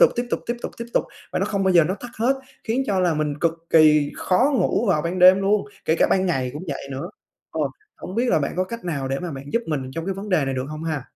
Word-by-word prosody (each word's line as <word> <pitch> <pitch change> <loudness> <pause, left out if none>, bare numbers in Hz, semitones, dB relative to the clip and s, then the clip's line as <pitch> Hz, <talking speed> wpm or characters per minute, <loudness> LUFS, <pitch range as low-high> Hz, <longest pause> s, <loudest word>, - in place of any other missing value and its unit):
tục, - - +7
tiếp 240 0 -1
tục, - - 0
tiếp 240 +1 -1
tục, - - -4
tiếp 235 - -5
tục - - +3 0.3
và - - 0
nó - - +1
không 195 -2 -1
bao 190 - +3
giờ 165 -2 +7
nó 185 +4 -1
tắt 245 - -8
hết, 250 +5 +2 0.3
khiến 240 +4 0
cho 195 -5 +1
là 175 -3 +2
mình 150 -1 -1
cực 165 -1 +2 0.2
kỳ 150 -2 +5
khó 245 +10 +2
ngủ 240 - +1
vào 150 -5 +2
ban 175 +2 -2
đêm 185 +1 +8
luôn, 200 +1 +2 0.2
kể 160 - +2
cả - - +5
ban 190 0 +3
ngày 130 -7 0
cũng 150 - -6
vậy 140 -1 -5
nữa. 135 0 -5 0.4
Ờ, - - -3 0.4
hổng 185 - -8
biết 240 +3 +1
là - - +4
bạn 140 - -2
có 185 - +1
cách 230 +1 -7
nào 140 -6 -2
để 135 +1 -1
mà 175 -2 -4
bạn 135 0 -7
giúp 235 - +1
mình 135 -4 -3
trong 165 +2 -4
cái 195 - -1
vấn 200 +2 -7
đề 160 -7 +2
này 135 - -2
được 130 0 -2
hông 155 +1 -6
ha? 155 -5 -2
175 Hz, 295 wpm, -23 LUFS, 150-200 Hz, 0.4 s, đêm